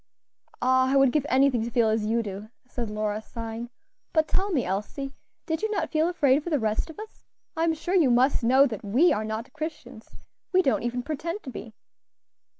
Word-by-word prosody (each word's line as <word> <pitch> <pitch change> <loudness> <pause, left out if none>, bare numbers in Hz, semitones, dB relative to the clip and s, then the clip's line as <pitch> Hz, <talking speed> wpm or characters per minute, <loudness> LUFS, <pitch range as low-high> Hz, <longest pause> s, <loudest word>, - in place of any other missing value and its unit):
"Ah! 260 +1 +3
I - - +2
would 270 -2 +5
give 290 0 0
anything 260 -2 +3
to 235 - -3
feel 235 -1 +2
as 215 -1 0
you 230 +1 +1
do," 205 +1 -7 0.2
said 240 -3 -4
Lora, 210 0 -2
sighing. 230 +1 -7 0.4
"But 315 -1 +3
tell 390 +2 0
me, 285 -8 +1
Elsie, 210 +9 -4 0.3
did 320 +1 -2
you 435 - 0
not 425 - -2
feel 315 +1 +2
afraid 290 -5 +2
for 345 - -4
the 305 - +2
rest 220 +3 -1
of 320 - -11
us? 435 0 -11 0.3
I'm 325 0 +1
sure 350 +3 -4
you 335 -8 +4
must 250 +2 +3
know 260 +4 +6
that 225 -7 -4
we 250 - +4
are 215 - -1
not 220 +3 -5
Christians; 310 -7 -7 0.4
we 370 0 +4
don't 270 - +2
even 245 +1 -2
pretend 330 +7 -4
to 260 - -7
be." 225 -2 -9
260 Hz, 205 wpm, -26 LUFS, 225-315 Hz, 0.4 s, know